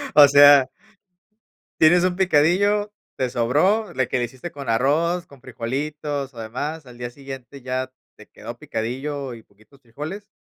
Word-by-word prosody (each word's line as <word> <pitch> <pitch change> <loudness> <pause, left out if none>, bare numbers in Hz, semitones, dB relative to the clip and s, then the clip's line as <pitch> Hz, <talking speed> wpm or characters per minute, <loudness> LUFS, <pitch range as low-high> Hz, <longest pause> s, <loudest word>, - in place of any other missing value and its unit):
o 145 -1 +9
sea 145 -1 +7 1.1
tienes 175 +3 +5
un 180 -1 +1
picadillo, 190 +4 +2 0.3
te 130 - -1
sobró 155 - +1
le 130 -1 0
que 130 - -1
le 120 - 0
hiciste 130 +8 -9
con 140 -3 -8
arroz, 160 +9 +1
con 140 -5 -18
frijolitos 140 +3 -4
o 120 - -11
demás, 145 +8 -5
al 125 -1 -14
día 120 -1 -4
siguiente 135 +1 -10
ya 130 0 -3 0.2
te - - -16
quedó - - -9
picadillo 130 +4 -4
y 115 - -11
poquitos 110 +6 -25
frijoles. 150 - -8
140 Hz, 155 wpm, -22 LUFS, 125-160 Hz, 1.1 s, o